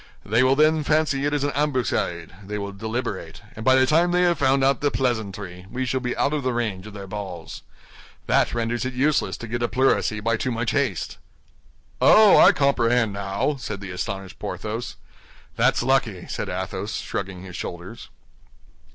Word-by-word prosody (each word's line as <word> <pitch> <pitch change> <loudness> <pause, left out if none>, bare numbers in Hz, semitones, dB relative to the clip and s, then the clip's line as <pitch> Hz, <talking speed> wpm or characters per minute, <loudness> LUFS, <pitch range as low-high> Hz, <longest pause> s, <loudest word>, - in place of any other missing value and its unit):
They 110 +4 +2
will 130 +1 +4
then 155 +1 +3
fancy 150 -2 +1
it 145 - +1
is 145 - -1
an 145 - 0
ambuscade, 130 - -1
they 105 +2 -5
will 100 -1 -4
deliberate; 110 +5 -5
and 110 - -7
by 130 +2 +5
the 130 0 +5
time 165 +5 +3
they 180 +1 +2
have 175 -2 +2
found 135 0 +3
out 135 +1 +2
the 145 - +2
pleasantry, 100 -8 -3
we 130 +3 -3
shall 130 +1 -1
be 125 -1 -3
out 140 - +1
of 150 - 0
the 130 -2 -1
range 105 -5 -3
of 105 - -11
their 100 -1 -7
balls. 95 -4 -7 0.6
That - - +2
renders 115 +1 -1
it 130 0 -4
useless 145 +4 +1
to 115 - -8
get 120 +1 -3
a 120 - +1
pleurisy 120 -2 +1
by 115 +1 0
too 130 - -2
much 115 -1 -1
haste." 135 - -1 0.8
"Oh, 215 -2 +7
I - - +8
comprehend 120 -5 +2
now," 100 +8 -2
said 105 -5 -5
the 95 -1 -7
astonished 95 +1 -5
Porthos. 110 +3 -5 0.6
"That's - - +2
lucky," 120 -8 +1
said - - -4
Athos, - - -4
shrugging 95 -2 -5
his 90 -2 -9
shoulders. 90 +6 -7
120 Hz, 185 wpm, -23 LUFS, 100-135 Hz, 0.8 s, I